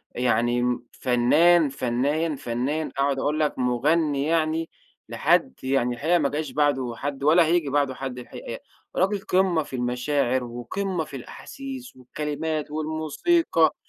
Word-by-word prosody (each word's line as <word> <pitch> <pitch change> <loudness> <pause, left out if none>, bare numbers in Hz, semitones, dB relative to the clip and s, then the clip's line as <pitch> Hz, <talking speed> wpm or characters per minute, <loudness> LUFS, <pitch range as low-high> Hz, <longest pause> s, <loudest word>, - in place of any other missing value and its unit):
يعني 120 0 +1
فنان، 150 +7 +4
فنان، 140 +5 0
فنان، 135 +6 -2
أقعد 140 0 +1
أقول 150 +3 0
لك 150 -3 0
مغني 140 +4 +1
يعني 160 0 0 0.4
لحد 65 - +2
يعني 130 -2 +1
الحقيقة 170 +7 +2
ما 140 -3 +1
جاش 150 +3 -3
بعده 140 -5 +1
حد 140 -1 -4
ولا 165 +3 +6
هييجي 165 -3 +1
بعده 140 -2 +1
حد 130 -1 -5
الحقيقة، 125 - -8 0.4
راجل 195 +3 +1
قمة 185 -4 +2
في 135 - -8
المشاعر 125 +1 0
وقمة 160 +10 -3
في 145 - -10
الأحاسيس 260 - -8
والكلمات 150 +4 -4
والموسيقى 160 - +1
145 Hz, 130 wpm, -25 LUFS, 125-160 Hz, 0.4 s, ولا